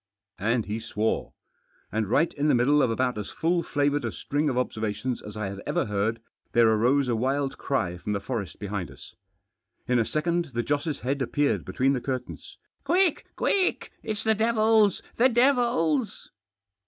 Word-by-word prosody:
Arid 115 +2 +1
he 105 +2 -3
swore. 110 -1 -2 0.6
And 110 0 -1
right 165 +8 +2
in 145 +1 0
the 150 - +4
middle 140 +5 +4
of 125 - +3
about 125 0 0
as 105 - -5
full 170 +2 0
flavoured 145 -2 0
a 115 - -2
string 150 +1 -1
of 125 - -2
observations 110 0 -2
as 105 0 -9
I 105 -2 -2
had 100 0 -7
ever - - 0
heard 105 +2 -1 0.3
there 115 -1 +5
arose 125 +5 +3
a 120 - +1
wild 135 +4 -1
cry 90 -11 -1
from 105 +4 -3
the 100 - -1
forest 105 -3 -4
behind 100 -5 -4
us. 70 - -13 0.7
In 125 0 +3
a - - +3
second 170 0 -1
the 120 - 0
Joss' 145 +2 -2
head 135 +2 -1
appeared 145 +3 0
between 135 +1 +1
the 125 - -2
curtains. 130 -1 -5
" - - -50
Quick! 365 -3 +2
quick! 385 -2 0
It's 215 -2 -3
the 220 - +4
devils— 220 -2 +3
the 255 +3 +5
devils 240 - +1
130 Hz, 180 wpm, -26 LUFS, 110-165 Hz, 0.7 s, there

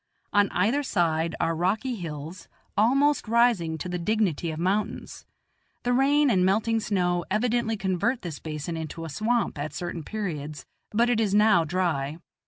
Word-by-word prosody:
On 205 -1 +4
either 225 +11 +1
side 170 - 0
are 165 0 +1
rocky 210 +10 0
hills, 165 -3 -7 0.3
almost 275 +6 +3
rising 225 -9 +2
to 160 - -5
the 180 0 -3
dignity 180 -4 0
of 155 - -4
mountains; 190 +5 -2 0.6
the 245 - +1
rain 280 +2 +4
and 185 -4 +3
melting 220 +4 +2
snow 180 -5 0
evidently 225 +2 0
convert 195 +6 -1
this 165 -5 -5
basin 155 +2 -5
into 160 0 -5
a - - -6
swamp 220 - 0
at 145 0 -4
certain 175 -1 -4
periods, 155 -8 -5 0.2
but 230 +3 +2
it 230 - +2
is 205 -3 +1
now 210 -6 +5
dry. 160 -4 -1
185 Hz, 160 wpm, -26 LUFS, 165-225 Hz, 0.6 s, now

